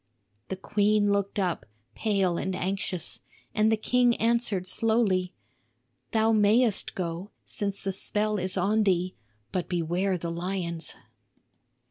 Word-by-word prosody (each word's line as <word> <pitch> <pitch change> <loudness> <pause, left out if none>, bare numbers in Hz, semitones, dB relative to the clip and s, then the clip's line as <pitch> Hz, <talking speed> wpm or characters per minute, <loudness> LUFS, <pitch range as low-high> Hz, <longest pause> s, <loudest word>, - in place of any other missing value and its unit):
The 190 - -3
queen 205 +1 +2
looked 200 0 0
up, 185 -4 0 0.3
pale 195 -5 +1
and 190 0 -2
anxious; 185 -2 -2 0.3
and 215 +1 +3
the 220 - +3
king 245 +2 +3
answered 225 -5 +1
slowly, 195 -3 +2 0.7
"Thou 220 0 +3
mayst 215 +1 +3
go, 175 +2 -4 0.2
since 200 -1 -3
the 195 - 0
spell 210 +2 0
is 185 +1 0
on 205 +4 +2
thee; 185 -3 +1 0.4
but 180 - -2
beware 180 +2 0
the 170 0 -4
lions." 170 -1 -3
195 Hz, 125 wpm, -27 LUFS, 180-215 Hz, 0.7 s, and